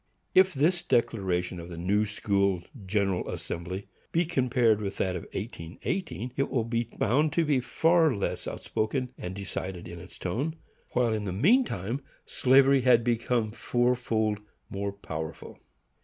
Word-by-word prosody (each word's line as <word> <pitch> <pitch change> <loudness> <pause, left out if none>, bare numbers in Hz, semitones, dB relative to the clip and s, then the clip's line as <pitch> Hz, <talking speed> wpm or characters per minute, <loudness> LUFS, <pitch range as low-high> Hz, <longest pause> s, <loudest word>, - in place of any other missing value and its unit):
If 185 -2 +5
this 170 +6 +3
declaration 90 -6 0
of 85 +1 -8
the 85 - -7
New 100 +5 +1
school 100 -3 +1 0.2
General 100 -2 0
Assembly 90 +4 -5 0.2
be 170 +1 +2
compared 125 -8 +2
with 100 -1 -4
that 95 -1 0
of 90 - -5
1818, 115 - -4
it 140 - 0
will 120 -4 +1
be 115 +1 -1
found 145 +10 +1
to 170 - +2
be 145 -3 +3
far 160 +5 +3
less 100 - -2
outspoken 125 +4 -2
and 90 +1 -6
decided 95 -2 -5
in 85 0 -8
its 90 +2 -12
tone, 135 - -2 0.4
while 120 -2 +2
in 105 -1 -2
the 95 - -2
mean 200 - +4
time 115 - -3 0.2
slavery 135 +1 +5
had 120 -2 +5
become 115 -1 +1
four 120 +2 +1
fold 110 -4 0 0.3
more 100 0 -2
powerful. 80 -5 -7
110 Hz, 155 wpm, -28 LUFS, 95-130 Hz, 0.4 s, If